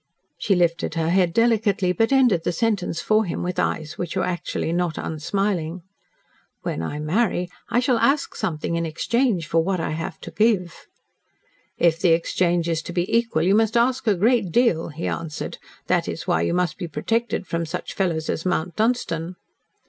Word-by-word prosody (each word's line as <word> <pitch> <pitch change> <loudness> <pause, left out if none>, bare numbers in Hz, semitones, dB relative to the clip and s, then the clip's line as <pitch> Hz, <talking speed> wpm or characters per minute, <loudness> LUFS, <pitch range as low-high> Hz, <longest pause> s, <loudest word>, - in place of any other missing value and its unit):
She 195 - +2
lifted 170 -2 +1
her 165 0 0
head 180 -2 +3
delicately, 220 -4 +2
but 225 +6 +1
ended 245 -11 +4
the - - 0
sentence 190 -2 -1
for 215 0 +3
him 175 - -3
with 180 0 -2
eyes 155 -1 -2
which 175 0 -3
were 185 - +1
actually 175 -2 -2
not 175 -2 -1
unsmiling. 175 +1 -2 0.8
"When - - -2
I 80 - -4
marry, 180 +3 0 0.2
I 240 - +2
shall 250 -2 +2
ask 280 +4 +2
something 170 -5 -2
in 170 - 0
exchange 195 +4 0
for 165 0 +2
what 190 +1 -1
I 165 - -2
have 165 +1 -4
to - - -8
give." 205 -6 0 0.9
"If 165 -1 +3
the 170 -2 +4
exchange 170 0 +1
is 165 -1 0
to 175 - -7
be 175 +4 0
equal, 230 -9 +1
you 190 +3 +3
must 225 +2 +3
ask 250 +1 +1
a 210 - +4
great 215 -1 +2
deal," 180 -7 +2
he 160 +2 -6
answered. 165 -3 -4 0.3
"That - - +1
is - - -5
why 80 - +1
you 85 - 0
must 180 -1 0
be 175 - -3
protected 225 +7 -1
from 165 -1 -2
such - - -5
fellows 165 -5 -1
as 160 - -2
Mount 175 -2 -1
Dunstan." 185 -7 -1
180 Hz, 185 wpm, -23 LUFS, 165-220 Hz, 0.9 s, ended